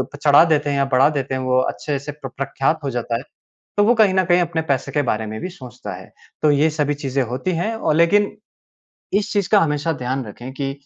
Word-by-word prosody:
चढ़ा 145 Hz, +1 st, +6 dB
देते 150 Hz, -3 st, +1 dB
हैं 140 Hz, -, 0 dB
या 140 Hz, -, +2 dB
बढ़ा 135 Hz, +3 st, +5 dB
देते 140 Hz, -3 st, -3 dB
हैं 130 Hz, -, -2 dB
वो 130 Hz, 0 st, +2 dB
अच्छे 140 Hz, +2 st, -3 dB
से 140 Hz, +2 st, -6 dB
प्र 145 Hz, -2 st, -8 dB
प्रख्यात 140 Hz, +3 st, 0 dB
हो 140 Hz, -, -1 dB
जाता 120 Hz, -2 st, -2 dB
है -, -, -6 dB, 0.6 s
तो 205 Hz, -, +4 dB
वो 235 Hz, +3 st, +4 dB
कहीं 215 Hz, -5 st, +4 dB
न 190 Hz, -, +4 dB
कहीं 175 Hz, 0 st, +3 dB
अपने 170 Hz, -2 st, -1 dB
पैसे 135 Hz, -2 st, -1 dB
के 145 Hz, -, +1 dB
बारे 110 Hz, -1 st, 0 dB
में 110 Hz, +1 st, -6 dB
भी -, -, -4 dB
सोचता 125 Hz, -9 st, -9 dB
है। -, -, -11 dB, 0.3 s
तो 150 Hz, -, +4 dB
ये 145 Hz, +2 st, +3 dB
सभी 150 Hz, -1 st, 0 dB
चीज़ें 140 Hz, -2 st, -1 dB
होती 125 Hz, +9 st, -3 dB
हैं 175 Hz, +7 st, -1 dB
अ, 225 Hz, -, 0 dB
लेकिन 200 Hz, +6 st, +3 dB, 0.8 s
इस 205 Hz, +1 st, +1 dB
चीज़ 200 Hz, -2 st, 0 dB
का 210 Hz, -, +6 dB
हमेशा 150 Hz, -1 st, 0 dB
ध्यान 130 Hz, -1 st, -3 dB
रखें 120 Hz, +4 st, -9 dB
कि 135 Hz, 0 st, -3 dB
145 Hz, 240 wpm, -20 LUFS, 130-170 Hz, 0.8 s, चढ़ा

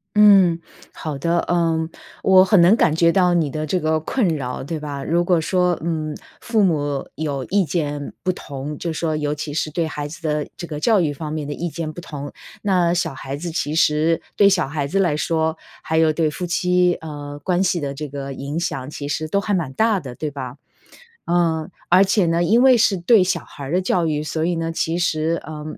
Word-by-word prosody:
嗯， 195 Hz, -5 st, +6 dB, 0.3 s
好 150 Hz, -3 st, -5 dB
的， 170 Hz, +4 st, +1 dB
呃， 175 Hz, -, -1 dB, 0.2 s
嗯， 160 Hz, 0 st, -2 dB, 0.3 s
我 190 Hz, -1 st, +6 dB
很 190 Hz, 0 st, +4 dB
能 180 Hz, +6 st, +6 dB
感 160 Hz, -9 st, +3 dB
觉 170 Hz, +1 st, +3 dB
到 180 Hz, -2 st, +3 dB
你 160 Hz, -4 st, +1 dB
的 155 Hz, +2 st, -3 dB
这 180 Hz, +4 st, 0 dB
个 155 Hz, 0 st, +1 dB
困 220 Hz, +4 st, 0 dB
扰， 125 Hz, -3 st, -4 dB
对 155 Hz, +4 st, -4 dB
吧。 145 Hz, -2 st, -5 dB
如 170 Hz, +2 st, +2 dB
果 175 Hz, -2 st, +2 dB
说， 180 Hz, +1 st, +1 dB
嗯， 155 Hz, -2 st, -2 dB, 0.3 s
父 225 Hz, -3 st, +1 dB
母 145 Hz, -6 st, 0 dB
有 140 Hz, -3 st, -3 dB
意 200 Hz, 0 st, +2 dB
见 145 Hz, -4 st, -3 dB
不 185 Hz, -, -2 dB
同， 145 Hz, -2 st, -7 dB
就 170 Hz, -, -3 dB
说 160 Hz, -1 st, -1 dB
尤 150 Hz, -1 st, -1 dB
其 145 Hz, 0 st, -5 dB
是 155 Hz, 0 st, -2 dB
对 165 Hz, 0 st, -1 dB
孩 150 Hz, -2 st, -5 dB
子 165 Hz, +2 st, -10 dB
的 150 Hz, -2 st, -1 dB
这 170 Hz, -, -6 dB
个 150 Hz, -1 st, -6 dB
教 220 Hz, -4 st, +4 dB
育 150 Hz, -4 st, 0 dB
方 150 Hz, +1 st, -6 dB
面 155 Hz, -2 st, -4 dB
的 145 Hz, -, -3 dB
意 175 Hz, +2 st, -3 dB
见 155 Hz, -1 st, -5 dB
不 175 Hz, -, -8 dB
同， 145 Hz, -3 st, -7 dB, 0.3 s
那 180 Hz, -4 st, +2 dB
小 175 Hz, -5 st, -1 dB
孩 135 Hz, +1 st, -6 dB
子 170 Hz, +2 st, -5 dB
其 155 Hz, -2 st, -2 dB
实 160 Hz, +1 st, +2 dB
对 200 Hz, -1 st, +6 dB
小 180 Hz, -7 st, +1 dB
孩 145 Hz, -1 st, -2 dB
子 195 Hz, +8 st, -1 dB
来 170 Hz, -6 st, +2 dB
说， 160 Hz, 0 st, 0 dB, 0.2 s
还 160 Hz, -, -1 dB
有 160 Hz, -1 st, +4 dB
对 155 Hz, 0 st, +1 dB
夫 180 Hz, +4 st, -5 dB
妻， 180 Hz, 0 st, +2 dB
呃， 145 Hz, -2 st, -7 dB
关 180 Hz, +3 st, +1 dB
系 180 Hz, -2 st, +1 dB
的 140 Hz, -2 st, -3 dB
这 150 Hz, 0 st, -6 dB
个 140 Hz, -1 st, -6 dB
影 140 Hz, +5 st, -4 dB
响 135 Hz, -5 st, -3 dB
其 145 Hz, -1 st, -6 dB
实 155 Hz, +1 st, -3 dB
都 200 Hz, -, +1 dB
还 205 Hz, 0 st, -2 dB
蛮 165 Hz, -8 st, -1 dB
大 215 Hz, +4 st, +1 dB
的 130 Hz, -3 st, -8 dB
对 150 Hz, +3 st, -4 dB
吧？ 130 Hz, -2 st, -7 dB, 0.7 s
呃， 165 Hz, -1 st, +1 dB, 0.2 s
而 185 Hz, +3 st, +6 dB
且 195 Hz, -1 st, +2 dB
呢， 170 Hz, +1 st, +1 dB
因 230 Hz, +7 st, +4 dB
为 260 Hz, -2 st, +7 dB
是 205 Hz, -3 st, +3 dB
对 185 Hz, +2 st, +4 dB
小 185 Hz, -, 0 dB
孩 140 Hz, -, -10 dB
儿 140 Hz, -, -5 dB
的 180 Hz, -, +2 dB
教 180 Hz, -2 st, +1 dB
育， 150 Hz, -1 st, -1 dB
所 160 Hz, +1 st, -2 dB
以 175 Hz, 0 st, +1 dB
呢， 165 Hz, 0 st, -2 dB
其 165 Hz, 0 st, -1 dB
实， 165 Hz, -1 st, 0 dB
呃， 150 Hz, 0 st, -7 dB
160 Hz, 240 characters per minute, -21 LUFS, 150-175 Hz, 0.7 s, 为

